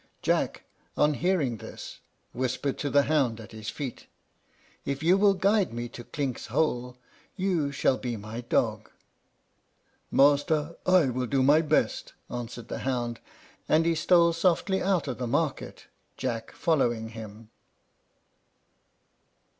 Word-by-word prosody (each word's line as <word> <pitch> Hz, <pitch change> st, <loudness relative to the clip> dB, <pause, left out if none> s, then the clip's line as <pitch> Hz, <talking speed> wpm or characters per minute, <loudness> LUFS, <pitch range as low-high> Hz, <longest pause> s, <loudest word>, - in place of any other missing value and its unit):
Jack, -, -, 0 dB, 0.3 s
on 150 Hz, 0 st, +4 dB
hearing 155 Hz, -8 st, 0 dB
this, -, -, -9 dB, 0.3 s
whispered 130 Hz, +2 st, -1 dB
to 145 Hz, -, -1 dB
the 140 Hz, 0 st, +4 dB
hound 135 Hz, -7 st, +1 dB
at 110 Hz, -, -11 dB
his 110 Hz, -1 st, -6 dB
feet, 135 Hz, -5 st, -6 dB, 0.8 s
"If 140 Hz, +2 st, -3 dB
you 175 Hz, +3 st, +5 dB
will 200 Hz, 0 st, +4 dB
guide 200 Hz, +1 st, +2 dB
me 120 Hz, 0 st, -4 dB
to 120 Hz, -, -9 dB
Clink's 135 Hz, -1 st, -4 dB
hole, 125 Hz, -1 st, -1 dB, 0.4 s
you 180 Hz, -7 st, 0 dB
shall 135 Hz, -2 st, +1 dB
be 120 Hz, -3 st, -3 dB
my 110 Hz, +3 st, -7 dB
dog." 120 Hz, -, 0 dB, 1.2 s
"Master, 145 Hz, +3 st, +3 dB
I 180 Hz, -7 st, +5 dB
will 125 Hz, 0 st, -2 dB
do 135 Hz, +1 st, +2 dB
my 145 Hz, +4 st, +5 dB
best," 155 Hz, -1 st, 0 dB, 0.2 s
answered 120 Hz, -1 st, -6 dB
the -, -, -5 dB
hound; 120 Hz, -3 st, -2 dB, 0.5 s
and 160 Hz, +1 st, +4 dB
he 170 Hz, -, +3 dB
stole 170 Hz, +1 st, +4 dB
softly 185 Hz, +3 st, +1 dB
out 185 Hz, -5 st, +1 dB
of 130 Hz, -, -4 dB
the 125 Hz, -, -2 dB
market, 145 Hz, +3 st, -2 dB, 0.3 s
Jack 115 Hz, -1 st, -3 dB
following 120 Hz, -8 st, 0 dB
him. 110 Hz, 0 st, -10 dB
140 Hz, 135 wpm, -27 LUFS, 120-165 Hz, 1.2 s, you